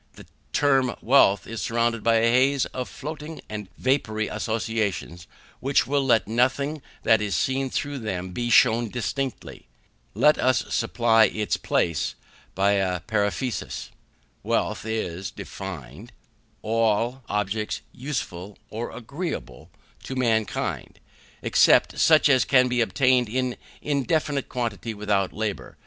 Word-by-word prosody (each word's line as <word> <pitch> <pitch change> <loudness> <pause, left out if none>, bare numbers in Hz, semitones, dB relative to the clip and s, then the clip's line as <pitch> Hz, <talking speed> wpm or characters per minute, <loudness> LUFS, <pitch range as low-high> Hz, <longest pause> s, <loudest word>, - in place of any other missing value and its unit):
The - - -14 0.3
term 135 -4 +2
wealth 115 -6 +4
is 115 -1 -6
surrounded 115 0 0
by 115 0 +4
a 115 +1 +3
haze 130 +2 +3
of 125 -1 -4
floating 155 +2 -7
and 105 -3 -6
vapoury 110 -5 0
associations, 105 -6 -3 0.3
which 135 +2 +2
will 140 0 +1
let 115 -7 +3
nothing 130 +6 0 0.2
that 110 -1 +4
is 100 -3 -1
seen 135 +8 0
through 145 +2 -3
them 95 -5 -4
be 120 +5 -3
shewn 115 0 +4
distinctly. 125 - -4 0.5
Let 150 - +4
us 130 0 +2
supply 115 -2 +3
its 105 0 -1
place 85 -3 0 0.4
by 100 +2 +3
a 95 -3 0
periphrasis. 110 +4 -2 0.5
Wealth - - -1
is 95 -4 -3
defined, 90 -13 -9 0.5
all 115 +3 +1
objects 105 +1 -2
useful 105 -8 -5
or 115 +2 -4
agreeable 115 - -6 0.4
to 130 - -5
mankind, 115 -4 -1 0.4
except - - +4
such 155 -1 +6
as 130 -3 +4
can 125 -2 +4
be 125 -1 +1
obtained 125 +3 +2
in 125 +1 -1 0.3
indefinite 145 0 0
quantity 115 -2 -3
without 100 -2 0
labour. 105 -1 -4
115 Hz, 125 wpm, -25 LUFS, 105-130 Hz, 0.5 s, such